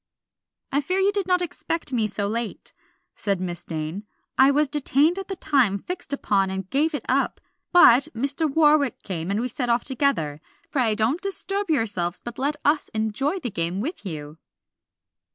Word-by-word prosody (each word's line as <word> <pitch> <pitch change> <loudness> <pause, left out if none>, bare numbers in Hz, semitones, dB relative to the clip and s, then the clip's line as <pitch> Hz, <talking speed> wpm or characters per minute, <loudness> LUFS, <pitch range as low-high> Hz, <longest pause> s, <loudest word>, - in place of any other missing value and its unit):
"I 280 - +2
fear 365 +6 -1
you 385 +1 +3
did 400 -2 -2
not 360 -1 +3
expect 330 -3 -3
me 225 -3 +2
so 200 0 -2
late," 230 +1 -4 0.4
said 200 -3 -1
Miss 175 -1 -3
Dane. 165 +6 -5 0.3
"I 265 +1 +6
was 295 +2 +3
detained 295 +5 +2
at 390 - -6
the 385 - -4
time 260 - +2
fixed 350 - -6
upon 200 -8 +1
and 190 -1 -4
gave 300 +3 +1
it - - -5
up, - - +1 0.3
but 270 -7 +7
Mr. 280 +5 0
Warwick 295 -4 +3
came, 175 -3 -4
and 200 +2 0
we 245 - -1
set 250 0 -3
off 235 +1 +2
together. 240 - 0 0.3
Pray 235 -6 +1
don't 235 +10 +1
disturb 395 0 -1
yourselves, 205 - 0
but 240 +1 -8
let 285 +3 0
us 295 +1 +2
enjoy 220 - -1
the 245 - -3
game 170 +1 -2
with 310 - -4
you." 155 -4 -7
255 Hz, 175 wpm, -24 LUFS, 200-305 Hz, 0.4 s, but